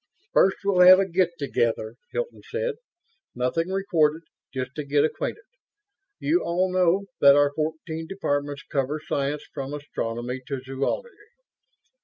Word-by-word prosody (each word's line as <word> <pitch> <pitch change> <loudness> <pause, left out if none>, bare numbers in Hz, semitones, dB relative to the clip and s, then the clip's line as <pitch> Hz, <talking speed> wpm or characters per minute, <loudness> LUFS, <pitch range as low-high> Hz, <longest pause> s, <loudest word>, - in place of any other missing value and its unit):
"First, 190 +1 +4
we'll 195 -2 +2
have 180 +1 +10
a 195 0 +1
get 180 0 +2
together," 115 -6 -1 0.2
Hilton 485 -1 -4
said. 480 +1 -1 0.6
"Nothing 125 +7 0
recorded; 170 -5 +1 0.3
just 130 -1 -4
to 150 - -4
get 145 +1 +2
acquainted. 435 - -3 0.8
You 335 +4 +2
all 180 +2 0
know 185 +2 +3
that 140 0 +8
our 145 0 +4
fourteen 160 +1 -3
departments 145 -6 -2
cover 140 +2 -2
science, 140 +1 -1
from 135 +1 -4
astronomy 125 -3 -4
to 140 -2 -3
zoology." 135 - -3
155 Hz, 135 wpm, -25 LUFS, 140-185 Hz, 0.8 s, have